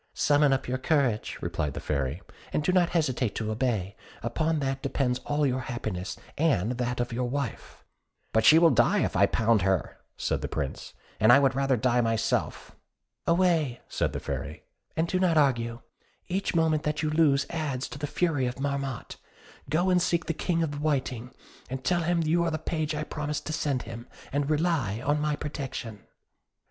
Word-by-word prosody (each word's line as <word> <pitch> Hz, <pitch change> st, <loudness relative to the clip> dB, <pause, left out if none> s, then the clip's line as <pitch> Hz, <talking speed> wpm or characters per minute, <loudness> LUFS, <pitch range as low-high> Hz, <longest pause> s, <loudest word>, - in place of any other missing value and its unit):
"Summon 145 Hz, -1 st, +4 dB
up 135 Hz, -, 0 dB
your 130 Hz, +1 st, -1 dB
courage," 130 Hz, -7 st, +1 dB
replied 75 Hz, -2 st, -2 dB
the -, -, -3 dB
Fairy, 70 Hz, +4 st, -2 dB, 0.3 s
"and 150 Hz, -, 0 dB
do 185 Hz, -, +2 dB
not 180 Hz, -2 st, +3 dB
hesitate 130 Hz, -, 0 dB
to 110 Hz, -1 st, -2 dB
obey; 110 Hz, -5 st, -1 dB, 0.3 s
upon 155 Hz, +8 st, 0 dB
that 135 Hz, -2 st, -2 dB
depends 135 Hz, -2 st, 0 dB
all 145 Hz, 0 st, +1 dB
your 130 Hz, -1 st, +1 dB
happiness, 110 Hz, -7 st, -4 dB, 0.2 s
and 125 Hz, -, +2 dB
that 125 Hz, 0 st, -1 dB
of 120 Hz, -1 st, -2 dB
your 125 Hz, +1 st, -1 dB
wife." 140 Hz, -3 st, -5 dB, 0.5 s
"But 110 Hz, -, +3 dB
she 155 Hz, -, +8 dB
will 165 Hz, -1 st, +6 dB
die -, -, +3 dB
if -, -, -2 dB
I -, -, +5 dB
pound 110 Hz, -2 st, +2 dB
her," 95 Hz, -1 st, 0 dB, 0.2 s
said -, -, -1 dB
the -, -, -2 dB
Prince, 70 Hz, -3 st, -5 dB, 0.2 s
"and 110 Hz, +2 st, +6 dB
I 125 Hz, -, +9 dB
would 135 Hz, -1 st, +3 dB
rather 135 Hz, -1 st, +1 dB
die 125 Hz, +2 st, +2 dB
myself." 115 Hz, -1 st, -1 dB, 0.5 s
"Away," 170 Hz, -7 st, +2 dB
said -, -, -1 dB
the -, -, -4 dB
Fairy, -, -, -5 dB, 0.3 s
"and 165 Hz, +1 st, +2 dB
do 185 Hz, -, 0 dB
not 175 Hz, -3 st, +3 dB
argue; 120 Hz, -4 st, +2 dB, 0.5 s
each 185 Hz, 0 st, -1 dB
moment 160 Hz, -2 st, +3 dB
that 150 Hz, 0 st, -2 dB
you 155 Hz, -, 0 dB
lose 150 Hz, -3 st, +3 dB
adds 145 Hz, -6 st, -2 dB
to -, -, -8 dB
the 145 Hz, -, -2 dB
fury 145 Hz, -5 st, 0 dB
of 125 Hz, +1 st, -5 dB
Marmotte. 140 Hz, -3 st, -3 dB, 0.5 s
Go 175 Hz, +5 st, +2 dB
and 180 Hz, -1 st, +4 dB
seek 175 Hz, -1 st, +1 dB
the 165 Hz, -, -1 dB
King 165 Hz, +1 st, 0 dB
of 155 Hz, -, -1 dB
the 145 Hz, -, -5 dB
Whiting; 130 Hz, -5 st, -1 dB, 0.5 s
tell 175 Hz, +3 st, +2 dB
him 170 Hz, 0 st, +1 dB
you 165 Hz, +2 st, +2 dB
are 170 Hz, -, +1 dB
the 155 Hz, -, -1 dB
page 155 Hz, -1 st, -2 dB
I 150 Hz, -, -2 dB
promised 150 Hz, -1 st, -4 dB
to 155 Hz, -, -3 dB
send 140 Hz, -4 st, -1 dB
him, 115 Hz, +1 st, -8 dB, 0.2 s
and 145 Hz, +1 st, 0 dB
rely 150 Hz, -, +1 dB
on 145 Hz, +1 st, +2 dB
my 150 Hz, 0 st, +1 dB
protection." 135 Hz, -7 st, -6 dB
140 Hz, 190 wpm, -27 LUFS, 120-155 Hz, 0.5 s, I